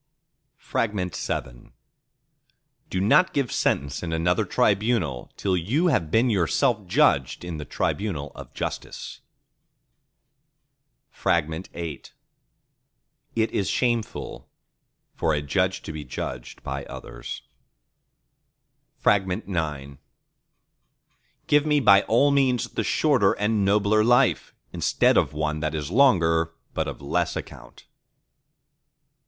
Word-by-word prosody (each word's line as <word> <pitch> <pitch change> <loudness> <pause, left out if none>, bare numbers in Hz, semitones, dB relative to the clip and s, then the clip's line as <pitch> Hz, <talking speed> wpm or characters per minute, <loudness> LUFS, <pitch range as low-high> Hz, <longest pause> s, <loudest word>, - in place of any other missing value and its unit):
VII 90 - -3 1.2
Do 95 - -2
not 110 - +4
give 140 -4 0
sentence 70 +1 0
in 85 - -4
another 90 +6 +1
tribunal 100 - 0
till 95 -2 0
you 125 - +1
have 85 - +1
been 115 +7 +3
yourself 105 - +1
judged 70 -2 +2
in 85 -2 -5
the 75 - -6
tribunal 75 -5 -2
of - - -11
Justice. - - -6 1.9
VIII 80 +2 0
If 85 -4 -5 1.5
is 100 - -1
shameful 120 -3 -2 0.6
for 80 - 0
a 75 - -1
Judge 95 +6 0
to 80 - -6
be 75 -1 -6
judged 60 -2 -7
by 70 +1 -4
others. - - -8 1.6
IX 85 -8 0 1.5
Give 145 0 +3
me 150 -1 +3
by 100 -7 +6
all 140 +6 +4
means 130 -3 +2
the - - -2
shorter 130 -11 +3
and 105 0 0
nobler 105 +2 +3
life, 120 +2 +2 0.2
instead - - +2
of - - +2
one 75 0 -2
that 75 0 -2
is 75 +1 -4
longer 80 -10 +3 0.2
but - - -1
of - - -7
less 70 - -1
account! - - -9
95 Hz, 105 wpm, -25 LUFS, 80-115 Hz, 1.9 s, by